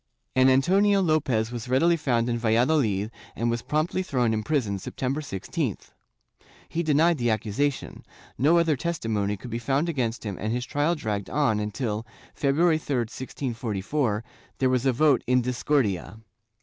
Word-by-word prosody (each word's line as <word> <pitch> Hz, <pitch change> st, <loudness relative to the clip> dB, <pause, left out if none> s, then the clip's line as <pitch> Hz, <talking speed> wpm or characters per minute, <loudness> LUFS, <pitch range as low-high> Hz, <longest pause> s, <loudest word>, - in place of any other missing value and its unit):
An 130 Hz, 0 st, +5 dB
Antonio 195 Hz, +10 st, +4 dB
Lopez 140 Hz, -, +1 dB
was 120 Hz, 0 st, -6 dB
readily 165 Hz, +7 st, +4 dB
found 125 Hz, -7 st, 0 dB
in 120 Hz, -1 st, -1 dB
Valladolid 115 Hz, -3 st, +2 dB, 0.2 s
and 115 Hz, 0 st, 0 dB
was 120 Hz, 0 st, -2 dB
promptly 155 Hz, +7 st, -1 dB
thrown 125 Hz, -10 st, 0 dB
in 110 Hz, -, 0 dB
prison, 110 Hz, -6 st, -1 dB
September 135 Hz, +9 st, -3 dB
16th. 95 Hz, -11 st, -4 dB, 0.8 s
He 170 Hz, -, -2 dB
denied 160 Hz, 0 st, +3 dB
the 120 Hz, -1 st, +1 dB
accusation; 110 Hz, +6 st, -2 dB, 0.3 s
no 155 Hz, +7 st, +4 dB
other 165 Hz, -3 st, +3 dB
testimony 110 Hz, -10 st, -2 dB
could 120 Hz, +5 st, -9 dB
be 115 Hz, -, -2 dB
found 135 Hz, +7 st, 0 dB
against 120 Hz, -7 st, -2 dB
him 100 Hz, -4 st, -4 dB
and 110 Hz, +2 st, -2 dB
his 125 Hz, +1 st, -2 dB
trial 145 Hz, +5 st, 0 dB
dragged 105 Hz, -9 st, -3 dB
on 135 Hz, -7 st, +1 dB
until, 105 Hz, +1 st, -3 dB, 0.3 s
February 155 Hz, +3 st, +2 dB
3, 145 Hz, -3 st, -3 dB
1644, 115 Hz, -1 st, -3 dB, 0.3 s
there 130 Hz, -1 st, +2 dB
was 130 Hz, +1 st, +1 dB
a -, -, +5 dB
vote 140 Hz, +2 st, +3 dB
in 125 Hz, 0 st, +3 dB
discordia. 120 Hz, -5 st, 0 dB
125 Hz, 155 wpm, -26 LUFS, 110-150 Hz, 0.8 s, An